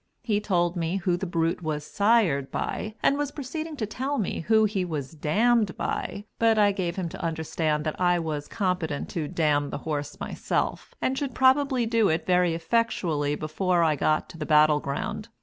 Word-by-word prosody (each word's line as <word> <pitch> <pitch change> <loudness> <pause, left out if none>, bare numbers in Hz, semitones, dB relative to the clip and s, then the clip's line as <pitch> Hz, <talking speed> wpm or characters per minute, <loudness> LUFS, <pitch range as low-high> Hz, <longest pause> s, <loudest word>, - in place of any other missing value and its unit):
He 210 -3 +1
told 175 -4 0
me 170 +1 -1
who 185 -2 0
the 185 +2 -4
brute 165 0 0
was 150 -2 -3
"sired" 200 - +2
by, 215 0 -3
and 280 - +3
was 290 -1 0
proceeding 310 +3 -5
to 220 - -1
tell 265 +7 -3
me 210 -7 -2
who 220 0 +5
he 200 -3 0
was 155 -6 -4
"dammed" 210 +7 +1
by, 205 - -3
but 225 -1 +4
I 205 -1 +5
gave 180 -3 -2
him 185 -3 -2
to - - -8
understand 160 -1 -1
that 155 +3 -3
I 175 -1 +4
was 155 -3 -3
competent 180 -8 -2
to 160 -4 -3
damn 145 -2 +1
the - - -4
horse 145 -2 -3
myself, - - -3
and 260 - +1
should 270 -3 -3
probably 260 -1 +3
do 225 -2 +2
it 160 +1 0
very 180 -2 +3
effectually 165 -6 0
before 170 +4 0
I 155 -2 +3
got 155 +2 +1
to 165 - -11
the 150 - -3
battle 150 -1 +5
ground. 145 +10 -4
180 Hz, 190 wpm, -26 LUFS, 155-220 Hz, -, who